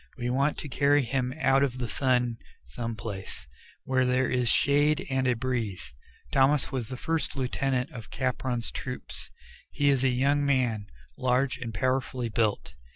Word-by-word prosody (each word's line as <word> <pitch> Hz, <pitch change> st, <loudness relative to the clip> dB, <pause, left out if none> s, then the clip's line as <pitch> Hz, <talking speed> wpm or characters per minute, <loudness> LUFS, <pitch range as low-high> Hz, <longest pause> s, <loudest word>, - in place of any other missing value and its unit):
We 125 Hz, 0 st, -2 dB
want 140 Hz, +3 st, +1 dB
to -, -, -5 dB
carry 145 Hz, +1 st, +3 dB
him 125 Hz, +1 st, -1 dB
out 135 Hz, -3 st, +4 dB
of 130 Hz, -3 st, +1 dB
the 125 Hz, -1 st, -2 dB
sun 125 Hz, -1 st, +1 dB, 0.3 s
some 115 Hz, -, -5 dB
place, 100 Hz, -, -6 dB, 0.4 s
where 130 Hz, -1 st, +2 dB
there 125 Hz, 0 st, +2 dB
is 125 Hz, -2 st, +1 dB
shade 145 Hz, +4 st, +3 dB
and 130 Hz, -1 st, +1 dB
a 125 Hz, -, +3 dB
breeze." 115 Hz, -, -3 dB, 0.4 s
Thomas 135 Hz, +1 st, +3 dB
was 130 Hz, -5 st, -2 dB
the 130 Hz, -, -5 dB
first 165 Hz, +4 st, -1 dB
lieutenant 130 Hz, 0 st, -1 dB
of 115 Hz, -3 st, -9 dB
Capron's 125 Hz, -2 st, -1 dB
troop. 125 Hz, -, -6 dB, 0.6 s
He 145 Hz, 0 st, +2 dB
is 135 Hz, -2 st, +1 dB
a 135 Hz, -, +4 dB
young 140 Hz, +3 st, +2 dB
man, 125 Hz, -7 st, +1 dB, 0.3 s
large 125 Hz, 0 st, +1 dB
and 120 Hz, -3 st, -4 dB
powerfully 130 Hz, -1 st, -1 dB
built. 110 Hz, -2 st, 0 dB
130 Hz, 160 wpm, -28 LUFS, 120-135 Hz, 0.6 s, out